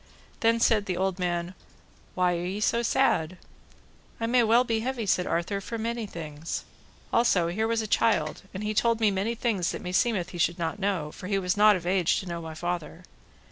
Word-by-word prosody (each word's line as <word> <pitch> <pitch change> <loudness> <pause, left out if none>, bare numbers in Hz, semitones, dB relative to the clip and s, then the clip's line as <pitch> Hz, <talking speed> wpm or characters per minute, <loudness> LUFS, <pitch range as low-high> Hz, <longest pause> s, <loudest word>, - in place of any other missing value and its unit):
Then 230 0 +3
said 220 -3 +3
the 180 -2 -1
old 190 0 -1
man, 175 0 -2 0.6
Why 180 -1 +2
are 170 - -3
ye 190 +3 -3
so 230 +2 +1
sad? 185 -9 +1 0.8
I 230 - -1
may 245 +2 +3
well 230 +2 +4
be 230 -3 0
heavy, 245 -1 -3
said 180 -2 +1
Arthur, 195 +4 -1
for 230 +4 -5
many 230 0 -3
things. 155 -3 -6 0.5
Also 185 -8 +3
here 220 +6 -1
was 230 -1 0
a - - -4
child, 205 -9 +1
and 210 +2 -3
told 230 +1 +2
me 215 -2 +3
many 200 +5 -1
things 215 -7 0
that - - -5
meseemeth 180 0 0
he 175 - -8
should 170 +1 +2
not 170 +3 -3
know, 190 -7 -1
for 185 - -9
he 200 0 +1
was 180 -1 0
not 210 0 +6
of 175 -2 -5
age 180 -1 +2
to - - -7
know 170 -2 -5
my 160 -1 -7
father. 175 0 -4
195 Hz, 205 wpm, -27 LUFS, 175-225 Hz, 0.8 s, not